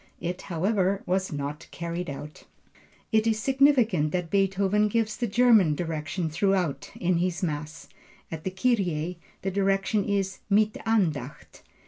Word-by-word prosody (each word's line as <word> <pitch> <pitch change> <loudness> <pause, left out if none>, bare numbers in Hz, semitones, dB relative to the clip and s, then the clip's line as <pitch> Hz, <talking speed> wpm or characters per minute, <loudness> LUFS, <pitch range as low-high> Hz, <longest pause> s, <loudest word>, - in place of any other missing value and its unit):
It, 175 +1 -4
however, 190 +2 0
was 190 +1 0
not 145 +1 -5
carried 170 0 -4
out. 145 +2 -8 0.7
It 220 0 +3
is 220 -1 +2
significant 245 - +3
that 180 -2 -2
Beethoven 195 +1 +2
gives 220 0 0
the 240 - -2
German 220 -8 +4
direction 160 +1 -3
throughout 180 -1 0
in 180 -1 +1
this 180 +1 -1
Mass. 155 0 -4 0.4
At 160 -1 -6
the - - -1
Kyrie 180 -5 0 0.2
the 195 - -1
direction 195 +1 +1
is 195 -1 -1
Mit 215 +1 +3
Andacht. 155 - -1
185 Hz, 135 wpm, -26 LUFS, 165-210 Hz, 0.7 s, German